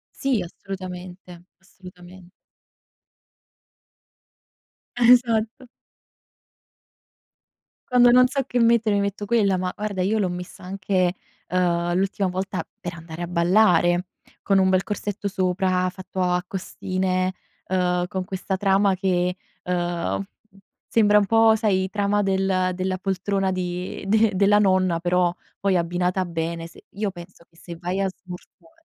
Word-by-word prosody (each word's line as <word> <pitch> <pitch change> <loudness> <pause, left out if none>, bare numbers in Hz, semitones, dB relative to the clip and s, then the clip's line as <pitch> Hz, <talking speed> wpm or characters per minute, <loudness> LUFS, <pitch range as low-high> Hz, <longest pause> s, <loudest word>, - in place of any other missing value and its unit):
Sì, 265 -6 0
assolutamente, 180 -1 -9 0.2
assolutamen 180 -1 -15 2.7
Esatto. 240 0 +3 2.2
Quando 245 -1 +6
non 250 +1 +6
so 275 +1 -1
che 245 - -1
mettere 230 -2 +3
mi - - +2
metto 200 +1 -3
quella, 200 -4 +2
ma 180 0 -2
guarda 205 -3 -3
io 215 +4 +1
l'ho 190 -3 +1
messa 180 0 -8
anche, 185 -1 -1 0.3
ehm, 175 -1 +1
l'ultima 195 0 0
volta 185 +1 -3 0.2
per 175 -1 -5
andare 165 +1 -8
a - - -2
ballare 175 0 +3 0.4
con 195 -1 +2
un 190 0 +4
bel 185 0 +3
corsetto 205 0 -4
sopra 185 -1 0
fatto 185 0 -7
a 180 0 +1
costine, 185 0 -2 0.3
ehm, 180 -1 0
con 190 -1 -4
questa 190 0 -3
trama 195 0 +2
che, 180 -1 0 0.3
ehm, 175 - -2 0.6
sembra 210 -2 +4
un 200 - +1
po' 225 0 +5
sai 190 -4 +1
trama 205 0 +1
del 190 -1 +1
della 185 0 -2
poltrona 195 0 -1
di 180 +1 -4
de 220 +1 +3
della 205 +2 +4
nonna, 185 -4 +2
però 180 0 +1 0.2
poi 195 -2 +1
abbinata 180 +2 0
bene, 165 0 -4
se 165 - -16
io 205 0 -3
penso 175 -2 -13
che 165 - -29
se 170 0 -10
vai 180 +3 -3
a 195 - +1
smorzare 195 - -13
185 Hz, 130 wpm, -23 LUFS, 180-200 Hz, 2.7 s, Quando